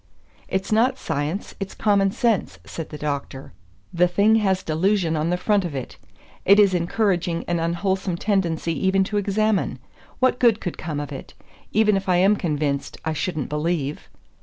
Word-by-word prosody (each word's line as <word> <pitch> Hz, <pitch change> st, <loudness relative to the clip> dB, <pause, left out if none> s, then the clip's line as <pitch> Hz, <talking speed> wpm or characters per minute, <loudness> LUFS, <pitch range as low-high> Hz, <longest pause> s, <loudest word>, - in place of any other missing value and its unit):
"It's 190 Hz, +2 st, -2 dB
not 245 Hz, +4 st, +3 dB
science, 150 Hz, -, -3 dB
it's 195 Hz, -1 st, -5 dB
common 200 Hz, -2 st, +2 dB
sense," 225 Hz, 0 st, 0 dB
said 165 Hz, -, -7 dB
the 150 Hz, -, -7 dB
Doctor. 140 Hz, -2 st, -5 dB, 0.4 s
"The 180 Hz, +1 st, +4 dB
thing 205 Hz, +5 st, +3 dB
has 190 Hz, -3 st, +1 dB
delusion 170 Hz, +1 st, +1 dB
on 155 Hz, +2 st, 0 dB
the 180 Hz, -, +1 dB
front 205 Hz, +1 st, +1 dB
of 170 Hz, -5 st, -4 dB
it. 130 Hz, -3 st, -6 dB, 0.5 s
It 200 Hz, +2 st, +6 dB
is 200 Hz, -2 st, +5 dB
encouraging 175 Hz, -1 st, 0 dB
an 175 Hz, -1 st, 0 dB
unwholesome 180 Hz, +2 st, -1 dB
tendency 170 Hz, -5 st, 0 dB
even 195 Hz, 0 st, +3 dB
to 205 Hz, +2 st, -2 dB
examine. 205 Hz, +1 st, 0 dB, 0.4 s
What 255 Hz, -1 st, +2 dB
good 230 Hz, -3 st, +4 dB
could 180 Hz, -, -5 dB
come 155 Hz, -3 st, -4 dB
of 145 Hz, 0 st, -5 dB
it? 135 Hz, -, -9 dB, 0.4 s
Even 210 Hz, -1 st, +3 dB
if 195 Hz, -1 st, -2 dB
I 180 Hz, -, +4 dB
am 195 Hz, +4 st, +4 dB
convinced, 150 Hz, -6 st, -2 dB
I 160 Hz, -, 0 dB
shouldn't 155 Hz, -2 st, -3 dB
believe." 150 Hz, -1 st, -2 dB
180 Hz, 170 wpm, -23 LUFS, 160-205 Hz, 0.5 s, It